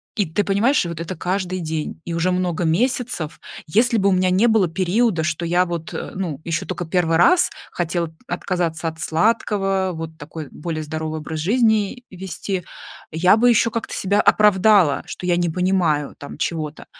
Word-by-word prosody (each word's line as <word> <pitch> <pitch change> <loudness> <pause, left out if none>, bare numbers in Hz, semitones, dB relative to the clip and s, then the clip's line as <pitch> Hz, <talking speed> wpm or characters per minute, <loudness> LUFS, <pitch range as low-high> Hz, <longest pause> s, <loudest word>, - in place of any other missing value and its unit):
И 205 - +1
ты 165 +6 0
понимаешь, 205 +6 +2
и - - -4
вот 170 -2 -6
это 170 +3 -5
каждый 185 +2 -2
день, 160 -2 -4
и 170 - -4
уже 170 +2 +1
много 180 -2 -1
месяцев. 220 - -1 0.3
Если 230 +8 +3
бы 200 -1 +3
у - - +2
меня 185 0 +2
не 190 +5 +3
было 220 -5 +3
периода, 185 +2 +1
что 155 +1 -2
я 175 +2 +2
вот, 170 -2 -5
э, - - -5
ну, 175 -7 -3
еще 165 0 -2
токо 180 -1 -4
1 165 -1 +1
раз 360 - +5 0.2
хотела 170 -1 -2
отказаться 175 -2 -2
от 160 0 -12
сладкого, 195 +1 +1
вот 160 0 -6
такой 150 0 -8
более 155 -1 -4
здоровый 155 +1 -4
образ 155 +1 -5
жизни 220 +4 +1
вести, 190 0 -4 0.5
я 180 +6 +4
бы 245 +2 +4
еще 230 0 +3
как-то 230 0 -4
себя 200 +2 +1
оправдала, 205 -6 +4
что - - -7
я 175 - +3
не 175 -1 +1
понимаю, 175 -4 +1
там, 145 - -9
чего-то. 155 -2 -3
180 Hz, 180 wpm, -21 LUFS, 160-200 Hz, 0.5 s, раз